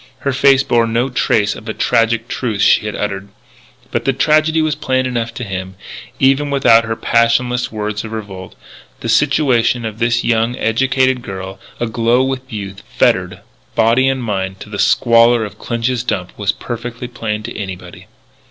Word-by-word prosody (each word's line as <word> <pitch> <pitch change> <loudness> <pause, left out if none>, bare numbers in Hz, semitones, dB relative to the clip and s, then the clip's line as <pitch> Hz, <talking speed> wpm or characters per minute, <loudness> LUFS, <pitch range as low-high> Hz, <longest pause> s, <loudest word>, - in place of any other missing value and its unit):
Her 140 - -1
face 135 0 +4
bore 115 -2 +2
no 120 +3 0
trace 110 -4 +1
of - - -11
the 110 - -5
tragic 115 0 +1
truth 110 -7 -2
she 105 - +4
had 105 - -4
uttered. 100 -1 -4 0.6
But - - -1
the 135 - +1
tragedy 155 +4 +2
was 155 -1 +1
plain 130 -3 -1
enough 120 -2 -2
to 125 - -5
him, 95 -2 -5 0.4
even 135 +2 +2
without 125 -5 +4
her 115 0 -2
passionless 120 +2 +1
words 105 -1 -3
of 110 - -8
revolt. 100 -4 -7 0.5
The 115 - -4
situation 125 -3 +2
of 110 0 -6
this 120 0 +1
young, 115 +1 +1
educated 130 +2 +1
girl, 95 -3 -7 0.2
aglow 120 +2 +1
with 130 -1 -4
youth, 100 -2 -6 0.2
fettered, - - +1 0.3
body 115 +4 +3
and 130 -2 -2
mind, 95 -3 -3
to 105 - -10
the 100 - -5
squalor 115 +1 +4
of 105 0 -11
Clinch's 120 +1 -2
dump, 90 -7 -3
was 100 -1 0
perfectly 120 +2 -6
plain 110 -3 -4
to - - -7
anybody. 95 -3 -8
115 Hz, 170 wpm, -17 LUFS, 105-125 Hz, 0.6 s, face